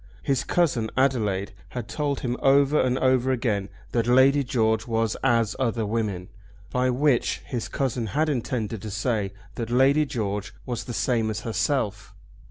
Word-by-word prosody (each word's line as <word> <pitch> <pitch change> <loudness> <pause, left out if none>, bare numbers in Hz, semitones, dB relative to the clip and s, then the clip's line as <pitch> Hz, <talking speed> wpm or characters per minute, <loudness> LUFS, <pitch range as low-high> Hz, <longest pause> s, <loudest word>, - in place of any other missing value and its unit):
His 135 -3 +1
cousin 135 -11 +1
Adelaide 110 -6 +1 0.2
had 120 -3 -5
told 140 +5 -2
him 120 -1 -1
over 140 +2 +4
and 130 0 +1
over 130 0 +2
again 105 -6 -1 0.2
that 115 -1 0
Lady 135 +3 +5
George 110 -3 +1
was 115 -1 0
as 115 -4 +2
other 115 -3 0
women, 105 -4 -2 0.4
by 125 0 +1
which 130 0 +1
his 120 -3 -4
cousin 125 -4 -2
had 155 +8 0
intended 120 -6 -2
to 110 - -6
say 105 -1 -1 0.3
that 115 -2 -3
Lady 135 +5 +4
George 105 -6 -3
was 120 -2 -4
the 120 - -5
same 115 -3 +1
as 110 - -3
herself. 115 -2 -2
120 Hz, 160 wpm, -25 LUFS, 110-135 Hz, 0.4 s, Lady